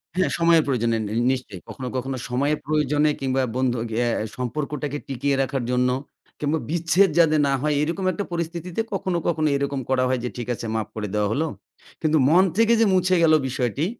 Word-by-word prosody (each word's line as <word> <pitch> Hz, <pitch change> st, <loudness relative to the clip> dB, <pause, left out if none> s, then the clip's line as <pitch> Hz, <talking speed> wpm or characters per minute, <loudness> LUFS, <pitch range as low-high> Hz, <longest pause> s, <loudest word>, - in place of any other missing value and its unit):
হ্যাঁ, 185 Hz, 0 st, +2 dB
সময়ের 165 Hz, -1 st, +5 dB
প্রয়োজনে 115 Hz, -4 st, +1 dB
নে 105 Hz, -, -5 dB, 0.2 s
নিশ্চয়ই। 125 Hz, -8 st, -5 dB
কখনো, 130 Hz, -2 st, -6 dB
কখনো 130 Hz, +1 st, -2 dB
সময়ের 140 Hz, +5 st, +1 dB
প্রয়োজনে 150 Hz, 0 st, +2 dB
কিংবা 135 Hz, 0 st, 0 dB
বন্ধু 130 Hz, -1 st, +1 dB, 0.3 s
এ -, -, +1 dB, 0.3 s
সম্পর্কটাকে 145 Hz, +3 st, -3 dB
টিকিয়ে 140 Hz, +1 st, -1 dB
রাখার 135 Hz, -1 st, -1 dB
জন্য 125 Hz, 0 st, +2 dB, 0.5 s
কিংবা 150 Hz, +2 st, 0 dB
বিচ্ছেদ 170 Hz, +4 st, +3 dB
যাতে 155 Hz, -2 st, +5 dB
না 140 Hz, -, +1 dB
হয় 150 Hz, +1 st, +1 dB
এরকম 170 Hz, +5 st, -2 dB
একটা 205 Hz, -, -3 dB
পরিস্থিতিতে 170 Hz, +3 st, -3 dB
কখনো, 185 Hz, -2 st, -1 dB
কখনো 155 Hz, -2 st, +1 dB
এরকম 140 Hz, 0 st, -2 dB
করা 130 Hz, -1 st, +2 dB
হয় 130 Hz, -1 st, +1 dB
যে 125 Hz, -, -2 dB
ঠিক 120 Hz, -, -5 dB
আছে 115 Hz, -, -6 dB
মাফ 110 Hz, -2 st, -1 dB
করে 105 Hz, -1 st, -3 dB
দেয়া 105 Hz, -1 st, +1 dB
হলো। 155 Hz, +8 st, 0 dB, 0.5 s
কিন্তু 155 Hz, 0 st, +2 dB
মন 175 Hz, +4 st, +6 dB
থেকে 230 Hz, +1 st, +4 dB
যে 225 Hz, -, +6 dB
মুছে 185 Hz, 0 st, +3 dB
গেল 160 Hz, -1 st, +5 dB, 0.2 s
বিষয়টি 125 Hz, +4 st, -1 dB
145 Hz, 185 wpm, -23 LUFS, 130-165 Hz, 0.5 s, মন